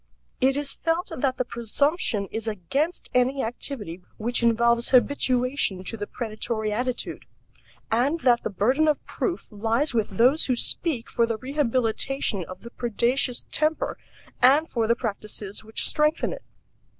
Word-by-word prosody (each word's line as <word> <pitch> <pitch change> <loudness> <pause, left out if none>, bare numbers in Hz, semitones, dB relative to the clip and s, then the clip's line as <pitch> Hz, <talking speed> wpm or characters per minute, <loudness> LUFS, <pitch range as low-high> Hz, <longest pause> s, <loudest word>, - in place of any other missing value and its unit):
It 270 +1 +3
is 285 -1 0
felt 330 +2 -1
that 260 0 -1
the 255 - 0
presumption 235 - 0
is 225 0 -4
against 245 - -2
any 255 +2 +2
activity 225 -6 -5 0.2
which 240 +3 -1
involves 235 0 +3
habituation 255 -5 +2
to 210 - -2
the 205 -2 -5
predatory 220 -1 -1
attitude, 245 +3 -3 0.7
and 265 +9 +2
that 240 -2 +4
the - - -3
burden 255 +10 +2
of 300 - 0
proof 360 -4 -3
lies 225 +7 0
with 225 -3 0
those 260 +7 +4
who 255 - +1
speak 255 0 0
for 235 - +1
the 230 -1 -2
rehabilitation 255 -4 0
of 185 +2 -10
the 235 - -10
predaceous 245 +2 0
temper 310 +1 +1 0.5
and 280 +6 +5
for 230 -2 0
the 235 - +3
practices 210 -3 -5
which 220 0 +1
strengthen 300 +1 +1
it. - - -9
245 Hz, 150 wpm, -25 LUFS, 225-280 Hz, 0.7 s, and